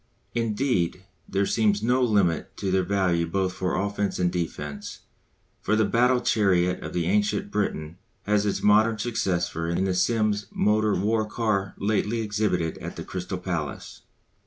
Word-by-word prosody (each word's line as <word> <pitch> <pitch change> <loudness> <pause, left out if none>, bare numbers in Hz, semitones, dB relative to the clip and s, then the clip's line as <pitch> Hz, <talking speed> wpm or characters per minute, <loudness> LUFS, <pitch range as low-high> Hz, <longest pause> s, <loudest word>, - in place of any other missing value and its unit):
Indeed, 115 -6 0 0.3
there 100 +1 +1
seems 105 -1 +1
no 125 +3 +2
limit 100 -9 +1
to 95 - -2
their 95 0 +3
value 90 -4 +1
both 95 +1 -1
for 90 0 -2
offence 100 0 -1
and 90 -1 +1
defence, 80 -4 -5 0.6
for 110 - +1
the 110 0 +3
battle 125 +3 +3
chariot 90 -4 +2
of - - -6
the 85 -1 0
ancient 105 +2 0
Briton 85 -5 -2 0.2
has 105 0 +2
its 100 - -1
modern 110 +2 +4
successor 90 -7 -1
in 85 +2 0
the 95 -1 +1
Simms' 105 +2 +1
motor 105 0 +2
war 110 +3 +1
car 105 -4 -1
lately 105 +2 0
exhibited 105 -6 -1
at - - -7
the - - -6
Crystal 90 0 -5
Palace. 85 -6 -5
100 Hz, 155 wpm, -25 LUFS, 90-110 Hz, 0.6 s, modern